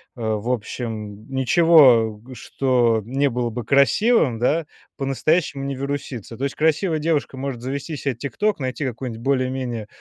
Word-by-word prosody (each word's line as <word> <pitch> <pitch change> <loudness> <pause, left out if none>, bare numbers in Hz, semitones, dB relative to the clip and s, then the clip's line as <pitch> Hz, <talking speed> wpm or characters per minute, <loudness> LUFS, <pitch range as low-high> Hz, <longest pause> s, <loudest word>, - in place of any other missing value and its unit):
э, 120 - -10
в 110 +1 -2
общем, 110 -3 -5
ничего, 130 -6 +5
что 120 -2 +1
не 135 +6 0
было 120 -1 -2
бы 115 0 -6
красивым, 140 - +3
да, 150 +7 +1 0.3
по-настоящему 140 +2 0
не 140 0 -3
вирусится. 135 -4 -5
То 135 - -5
есть 140 - -4
красивая 160 +2 +1
девушка 150 -3 -1
может 130 -2 -5
завести 140 +4 -4
себе 135 -2 -2
"Тикток", 200 - -2
найти 130 +3 -3
какую-нибудь 120 -2 -5
более-менее 130 -4 -1
130 Hz, 145 wpm, -22 LUFS, 115-140 Hz, 0.3 s, ничего